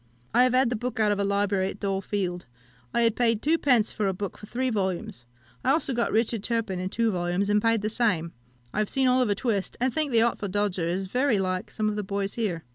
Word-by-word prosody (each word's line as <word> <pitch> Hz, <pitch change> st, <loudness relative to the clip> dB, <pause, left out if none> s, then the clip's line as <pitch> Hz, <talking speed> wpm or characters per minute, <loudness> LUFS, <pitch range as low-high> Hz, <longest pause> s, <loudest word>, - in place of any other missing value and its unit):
I 245 Hz, +2 st, +6 dB
have 255 Hz, 0 st, +2 dB
had 255 Hz, -1 st, +3 dB
the -, -, +1 dB
book 245 Hz, +1 st, -4 dB
out 210 Hz, -1 st, +3 dB
of 205 Hz, -, 0 dB
a -, -, +2 dB
library 200 Hz, -1 st, +1 dB
at 205 Hz, -, -8 dB
Dole 195 Hz, -1 st, -1 dB
Field. 180 Hz, -5 st, -3 dB, 0.4 s
I 235 Hz, -, +1 dB
had 230 Hz, -2 st, +3 dB
paid 230 Hz, -3 st, +2 dB
two 325 Hz, +3 st, +2 dB
pence 245 Hz, -6 st, +2 dB
a 195 Hz, -2 st, +1 dB
book 200 Hz, +1 st, -5 dB
for 210 Hz, -, -12 dB
three 255 Hz, +3 st, -1 dB
volumes. 190 Hz, -, -3 dB, 0.4 s
I -, -, +1 dB
also 290 Hz, -4 st, +2 dB
got 235 Hz, -1 st, 0 dB
Richard 225 Hz, 0 st, +1 dB
Turpin, 220 Hz, -4 st, -1 dB
in 185 Hz, +1 st, -2 dB
two 230 Hz, +2 st, +1 dB
volumes, 180 Hz, +2 st, 0 dB
and 210 Hz, 0 st, +3 dB
paid 225 Hz, -1 st, +2 dB
the 215 Hz, -, 0 dB
same. 190 Hz, -9 st, 0 dB, 0.4 s
I -, -, -1 dB
have 215 Hz, -, 0 dB
seen 265 Hz, -1 st, +1 dB
Oliver 250 Hz, -5 st, +3 dB
Twist, 210 Hz, -4 st, -2 dB
and 255 Hz, 0 st, +1 dB
think 305 Hz, -1 st, 0 dB
the 230 Hz, -1 st, +4 dB
Artful 220 Hz, -3 st, -1 dB
Dodger 195 Hz, -3 st, 0 dB
is 185 Hz, +3 st, -1 dB
very 250 Hz, +4 st, +1 dB
like 185 Hz, +1 st, -2 dB
some 215 Hz, -1 st, -2 dB
of 210 Hz, 0 st, -1 dB
the 210 Hz, -, -1 dB
boys 200 Hz, 0 st, -3 dB
here. 195 Hz, -8 st, -2 dB
210 Hz, 245 wpm, -26 LUFS, 195-235 Hz, 0.4 s, I